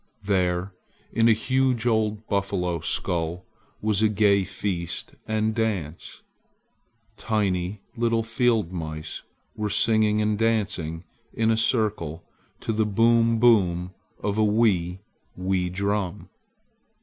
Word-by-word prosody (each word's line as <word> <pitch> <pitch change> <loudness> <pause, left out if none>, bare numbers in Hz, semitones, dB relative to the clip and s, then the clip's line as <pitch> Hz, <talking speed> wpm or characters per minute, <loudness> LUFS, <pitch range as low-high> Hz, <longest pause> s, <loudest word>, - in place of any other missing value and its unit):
There 95 -1 0 0.4
in 115 0 +3
a - - +6
huge 130 +1 +1
old 110 -2 +1
buffalo 90 -4 -1
skull 85 +1 -2 0.4
was 105 -1 +1
a 110 - +4
gay 100 -1 +3
feast 95 -3 -4
and 110 0 0
dance! 100 -9 -3 0.9
Tiny 100 -2 -1
little 115 -1 +1
field 115 -5 +1
mice 80 -3 -5 0.3
were 105 -1 -2
singing 110 0 +3
and 105 -1 0
dancing 100 -8 -1 0.3
in 115 -1 +2
a - - +3
circle 105 - 0 0.4
to 115 - -2
the 110 0 +1
boom 115 +2 +3
boom 95 -7 +3 0.3
of 105 +1 -2
a - - +4
wee, 100 -5 +2 0.4
wee 90 -1 0
drum. 100 0 -2
105 Hz, 115 wpm, -25 LUFS, 90-110 Hz, 0.9 s, a